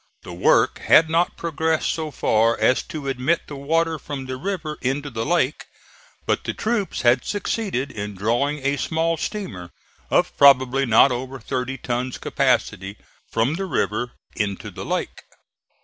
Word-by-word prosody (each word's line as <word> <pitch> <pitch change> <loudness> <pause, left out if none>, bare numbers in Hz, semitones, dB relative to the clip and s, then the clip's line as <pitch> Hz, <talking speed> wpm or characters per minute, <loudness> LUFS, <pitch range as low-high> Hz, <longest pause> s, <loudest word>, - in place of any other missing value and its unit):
The 90 - -8
work 85 - +3
had 160 0 +5
not 170 +2 +1
progressed 160 -1 0
so 160 -1 -3
far 115 -4 +2
as 130 - +3
to 150 -3 -6
admit 135 +5 +1
the 145 - -8
water 160 +3 0
from 140 -2 -6
the 130 0 -4
river 155 0 -4
into 140 +3 -2
the 115 -1 -3
lake, 160 -5 +1 0.6
but - - 0
the - - -3
troops 215 - -1
had 125 +1 +4
succeeded 195 - -2
in 105 -1 -6
drawing 130 +8 0
a 140 +1 +1
small 165 +3 0
steamer, 130 - -5 0.4
of - - +2
probably 135 -1 +5
not 115 +4 +6
over 130 +2 -4
thirty 130 +3 -3
tons' 125 0 -3
capacity, 95 +2 0 0.3
from 115 +6 +1
the 195 +4 -3
river 120 - -1 0.2
into 100 -3 -3
the - - -7
lake. - - -3
135 Hz, 155 wpm, -22 LUFS, 120-160 Hz, 0.6 s, not